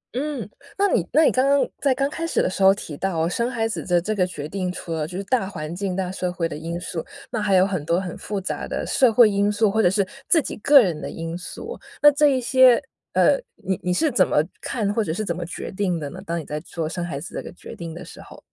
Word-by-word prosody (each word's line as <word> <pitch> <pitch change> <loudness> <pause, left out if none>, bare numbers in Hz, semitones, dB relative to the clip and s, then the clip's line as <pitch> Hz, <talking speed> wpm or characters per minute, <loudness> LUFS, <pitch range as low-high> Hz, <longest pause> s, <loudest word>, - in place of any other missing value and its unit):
嗯， 275 -4 -3 0.3
那 405 +1 +3
你 215 - +2
那 310 +4 +5
你 - - +5
刚 255 - +2
刚 280 0 +3
在 275 -2 +3
刚 275 +1 +1
开 325 +3 -4
始 - - 0
的 - - +2
时 185 - -4
候 190 0 +8
提 195 -6 -5
到 165 -3 0
生 235 +7 -1
孩 230 -3 -1
子 225 - -4
的 175 -1 +2
这 210 +6 -2
个 185 -4 +1
决 150 -5 -6
定， 185 +1 -3
除 170 -2 -6
了 155 -2 -2
就 180 +2 -7
是 195 - -3
大 230 -1 0
环 155 -3 -6
境 190 0 -2
大 185 -1 -2
社 180 -1 -2
会 170 -2 -1
的 150 - -7
因 170 +3 -5
素， 170 -2 -5 0.3
那 230 -3 -1
还 205 -2 +2
有 185 0 +6
很 185 -6 -2
多 170 +3 +1
很 185 -3 -5
复 205 -1 -4
杂 190 - -4
的 - - -3
社 255 -4 +3
会 235 0 +7
因 200 0 +1
素， 210 0 +2
或 220 +2 +2
者 180 - +5
是 195 +1 +1 0.2
自 335 - +6
己 295 - -4
个 280 +6 +7
人 165 -6 -2
的 - - -5
因 165 0 -5
素。 440 - -7 0.2
那 295 - +8
这 295 +1 +4
一 270 -2 +2
些， 255 -1 +5 0.3
呃， - - +4 0.2
你 190 -1 -3
你 180 - -1
是 305 - +2
怎 195 -7 +3
么 - - 0 0.2
看 210 -4 -1
或 225 - +1
者 180 - -3
是 215 +6 -2
怎 170 - -2
么 175 - -4
决 175 - -6
定 185 -3 -1
的 145 -2 -5
呢？ 185 - -9
当 170 -2 -3
你 160 - -7
在 150 - -4
做 165 0 -5
生 175 +2 -4
孩 165 -5 -4
子 170 - -9
这 - - -3
个 - - -9
决 - - -11
定 170 -1 -7
的 170 - -8
时 - - -12
候。 - - -13
190 Hz, 305 characters per minute, -23 LUFS, 170-235 Hz, 0.3 s, 候